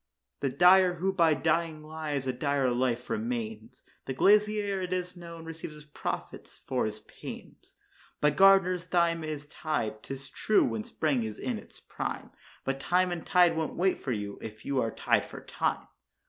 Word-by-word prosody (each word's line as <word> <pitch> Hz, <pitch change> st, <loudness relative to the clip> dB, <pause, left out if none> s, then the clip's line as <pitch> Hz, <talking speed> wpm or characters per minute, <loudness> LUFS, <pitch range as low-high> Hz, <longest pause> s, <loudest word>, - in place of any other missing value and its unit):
The 140 Hz, -, 0 dB
dyer, 180 Hz, +6 st, +6 dB
who 190 Hz, +3 st, 0 dB
by 165 Hz, -4 st, +4 dB
dying 160 Hz, +2 st, 0 dB
lives, 155 Hz, -3 st, -4 dB
a 130 Hz, -, 0 dB
dire 135 Hz, 0 st, +1 dB
life 125 Hz, 0 st, 0 dB
maintains; 230 Hz, 0 st, -4 dB, 0.2 s
The 130 Hz, -, -3 dB
glazier, 205 Hz, +2 st, +3 dB
it 180 Hz, -1 st, -4 dB
is 180 Hz, 0 st, -2 dB
known, 170 Hz, -2 st, -9 dB
receives 160 Hz, -1 st, -7 dB
his 150 Hz, 0 st, -13 dB
profits 150 Hz, -, -6 dB
for 130 Hz, -4 st, 0 dB
his 105 Hz, 0 st, -6 dB
panes. -, -, -11 dB, 0.4 s
By 150 Hz, -, +4 dB
gardeners 185 Hz, +1 st, +5 dB
thyme 170 Hz, -2 st, +1 dB
is 155 Hz, -2 st, -5 dB
tied, 120 Hz, -9 st, -3 dB
'tis 135 Hz, +2 st, -7 dB
true, 215 Hz, -, +3 dB
when 115 Hz, -2 st, -2 dB
spring 145 Hz, -1 st, 0 dB
is 110 Hz, -2 st, -4 dB
in -, -, -3 dB
its -, -, -15 dB
prime; -, -, -5 dB, 0.3 s
But 135 Hz, 0 st, -1 dB
time 180 Hz, +5 st, +2 dB
and 175 Hz, -2 st, -4 dB
tide 175 Hz, -2 st, +4 dB
won't 160 Hz, -1 st, -2 dB
wait 185 Hz, +1 st, +1 dB
for 135 Hz, -, -2 dB
you 105 Hz, -3 st, -4 dB
if 110 Hz, 0 st, -9 dB
you 135 Hz, -2 st, +1 dB
are 115 Hz, -, 0 dB
tied -, -, +1 dB
for -, -, -9 dB
time. -, -, -1 dB
160 Hz, 175 wpm, -29 LUFS, 135-180 Hz, 0.4 s, dyer